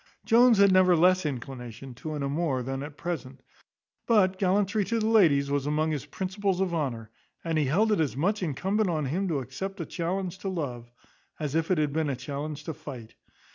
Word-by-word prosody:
Jones 240 0 +6
had 200 -1 +6
never 185 -1 +5
less 180 0 +4
inclination 125 -1 -7
to 155 +6 -6
an 145 - -3
amour 140 -2 -1
than 135 +2 -4
at 145 +1 -8
present; 140 -6 -5 0.6
but 190 -5 +3
gallantry 200 +2 +2
to 230 +2 0
the 215 - 0
ladies 155 -11 +4
was 140 0 0
among 155 +2 +1
his 150 -2 -4
principles 190 +3 -2
of 190 -2 0
honour; 120 -9 -3 0.3
and 165 -1 -1
he 150 - +2
held 205 +11 +2
it 210 - +2
as 145 -5 0
much 200 +8 0
incumbent 190 +6 0
on 155 -4 -1
him 180 +9 -1
to 160 -5 0
accept 185 +10 -5
a 165 - -3
challenge 185 +2 -3
to 195 - -3
love, 125 -10 -4 0.5
as 150 -3 -3
if 165 0 0
it 185 - +2
had 150 -2 0
been 155 -1 0
a 135 - -1
challenge 145 +3 -5
to 160 - -4
fight. 125 -6 -9
160 Hz, 205 wpm, -27 LUFS, 140-190 Hz, 0.6 s, Jones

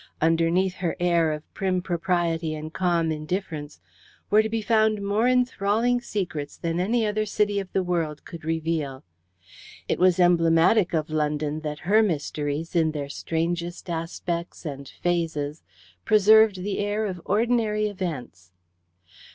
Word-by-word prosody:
Underneath 165 +3 +2
her 175 -3 -2
air 170 -2 +2
of 150 0 -7
prim 185 -1 0
propriety 175 -3 -1
and 155 +1 -7
calm 170 -3 +1
indifference 155 - -4 0.5
were 210 +1 +6
to 220 - -3
be 225 0 -2
found 215 -1 +3
more 205 +4 +1
enthralling 245 -1 +2
secrets 170 -11 -4
than 165 0 -2
any 225 +5 +1
other 215 0 0
city 205 -1 0
of 195 -2 -6
the 190 - +1
world 165 -4 -2
could 170 -2 -9
reveal. 160 -4 -2 0.8
It - - -1
was 185 0 +4
emblematic 175 +2 +4
of 155 0 -1
London 150 0 -1
that 150 -1 -5
her 210 +4 +5
mysteries, 155 -3 -2
in 160 -2 +2
their 145 -2 -4
strangest 170 +3 -3
aspects 170 +1 -4
and 140 -2 -6
phases, 160 -4 -2 0.4
preserved 215 -2 +5
the 205 0 -2
air 205 +1 -1
of 185 -4 -4
ordinary 215 0 +1
events. 150 - -6
175 Hz, 140 wpm, -25 LUFS, 160-205 Hz, 0.8 s, were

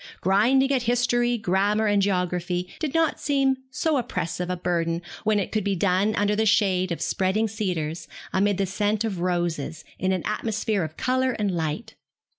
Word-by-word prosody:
Grinding 245 +9 +3
at 265 -2 +2
history, 240 0 +1
grammar, 205 +1 +1
and 205 -1 +3
geography 180 -2 -1
did 310 -2 -3
not 325 -1 +2
seem 275 -2 +2
so 305 +3 0
oppressive 180 -7 -3
a 180 - -1
burden 170 -1 -1 0.2
when 215 -1 +3
it 195 - -3
could 215 - 0
be 200 0 0
done 195 +3 +2
under 205 0 +1
the 220 - +2
shade 190 -4 +2
of 170 - -2
spreading 195 +4 +1
cedars, 175 -6 -3 0.3
amid 200 0 +2
the 200 - +1
scent 205 +3 0
of 205 -6 -2
roses, 175 -4 -2
in 185 - +1
an 185 -2 -1
atmosphere 215 -2 -1
of 155 0 -6
colour 255 0 +1
and 210 -4 -1
light. 175 +7 -3
200 Hz, 175 wpm, -25 LUFS, 180-225 Hz, 0.3 s, Grinding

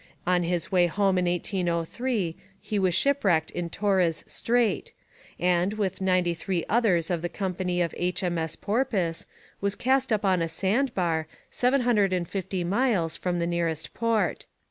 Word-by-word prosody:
On 180 0 +3
his 170 -1 -2
way 180 -2 +4
home 195 +1 +2
in 180 - +1
1803 175 +3 -1 0.2
he 210 - -2
was 185 -3 +2
shipwrecked 195 - +2
in 175 -1 -3
Torres 185 -4 +1
Strait, 235 -2 0 0.5
and, 180 +3 +2
with 195 -3 -2
ninety 185 -2 +2
three 175 0 -2
others 195 -8 +2
of 170 -2 0
the 175 - -2
company 180 -2 -1
of 170 - -3
H.M.S. 175 -2 -1
Porpoise, 200 -7 -1 0.3
was 200 0 0
cast 265 0 +1
up 210 -1 +1
on 185 -2 +3
a 165 - -1
sandbar, 185 - 0 0.2
seven 255 +2 +2
hundred 210 -6 +2
and 175 -2 -1
fifty 190 -1 -3
miles 190 -4 +1
from 180 -1 -2
the 170 - 0
nearest 170 -2 -2
port. 220 -7 0
185 Hz, 155 wpm, -26 LUFS, 170-210 Hz, 0.5 s, way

